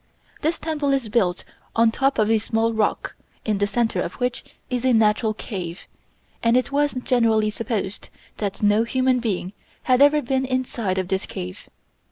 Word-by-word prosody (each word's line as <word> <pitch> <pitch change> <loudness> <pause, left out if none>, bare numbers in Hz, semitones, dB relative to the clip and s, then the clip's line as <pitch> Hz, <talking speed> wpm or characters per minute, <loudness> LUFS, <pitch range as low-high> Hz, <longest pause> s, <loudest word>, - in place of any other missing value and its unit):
This 320 +2 0
temple 295 -3 -1
is 265 -5 -1
built 190 -5 +1 0.3
on 230 0 +4
top 270 +4 +1
of 215 0 +2
a 225 - +4
small 225 +1 0
rock, 220 -1 0 0.3
in 210 -2 0
the 205 - +2
center 225 +2 0
of - - -4
which 250 0 -2 0.2
is 250 -1 -2
a 260 -1 +3
natural 215 0 +3
cave, 180 -5 -6 0.6
and 230 +1 +4
it 255 - 0
was 290 0 +1
generally 225 -4 +2
supposed 210 -3 -3 0.3
that 205 0 -3
no 210 +2 +4
human 255 +1 +1
being 200 -5 -2 0.3
had 255 0 +3
ever 290 +1 +5
been 265 +2 0
inside 250 -7 -1
of 185 -1 -1
this 190 0 -1
cave. 90 0 -7
230 Hz, 175 wpm, -23 LUFS, 210-255 Hz, 0.6 s, ever